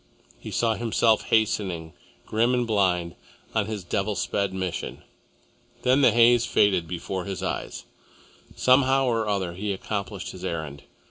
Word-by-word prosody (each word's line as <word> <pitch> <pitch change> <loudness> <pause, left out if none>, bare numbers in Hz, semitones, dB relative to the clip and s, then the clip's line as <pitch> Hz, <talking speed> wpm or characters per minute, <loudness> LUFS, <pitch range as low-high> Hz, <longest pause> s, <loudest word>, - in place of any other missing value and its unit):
He - - -8
saw 115 -1 +1
himself 115 -1 +2
hastening, 95 -7 0 0.3
grim 115 +3 +1
and 125 -1 +1
blind, 90 -6 +1 0.4
on 110 -2 0
his 105 -3 -4
devil 100 +4 -1
sped 100 +2 -1
mission. 95 -2 -4 0.8
Then 130 +3 +4
the 135 - +7
haze 120 0 +5
faded 100 -7 +2
from - - -16
before 90 +1 -4
his 95 -2 -5
eyes. - - -4 0.7
Somehow 130 +1 +4
or 115 -3 0
other 95 -4 -1
he 100 +3 -3
accomplished 100 +1 -4
his - - -11
errand. 75 -4 -4
105 Hz, 145 wpm, -25 LUFS, 90-115 Hz, 0.8 s, the